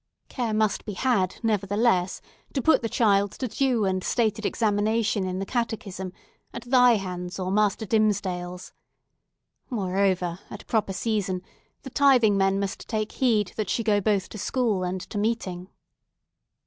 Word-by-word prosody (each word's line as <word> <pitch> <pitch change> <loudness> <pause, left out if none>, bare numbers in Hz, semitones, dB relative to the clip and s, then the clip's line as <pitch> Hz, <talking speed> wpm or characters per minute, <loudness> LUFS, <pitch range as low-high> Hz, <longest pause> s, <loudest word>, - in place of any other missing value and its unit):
Care 235 -4 -2
must 215 -1 +1
be 210 - -5
had 195 -4 0
nevertheless, 205 -2 +1 0.3
to 270 - 0
put 320 - +4
the 230 - -2
child 200 -4 +2
to 255 - -3
due 245 -2 +1
and 185 -1 0
stated 220 -3 0
examination 215 -1 +1
in 185 0 -3
the 195 - -3
catechism, 210 -6 -3 0.4
at - - -6
thy 250 0 +5
hands 180 -3 -4
or 185 -1 -2
Master 210 +1 +1
Dimmesdale's. 185 -4 -1 1.0
Moreover, 190 -5 0
at - - -9
a - - -38
proper 215 -4 0
season, 195 -3 -1 0.4
the 265 - -8
tithing 250 -7 +4
men 195 0 +2
must 200 +1 -4
take 215 -1 -2
heed 220 -7 +1
that 215 -3 -2
she 230 - 0
go 210 -2 +2
both 200 -2 +1
to 215 - -8
school 220 -2 0
and 180 +1 -3
to 205 - -5
meeting." 200 -5 -2
205 Hz, 155 wpm, -25 LUFS, 190-225 Hz, 1.0 s, thy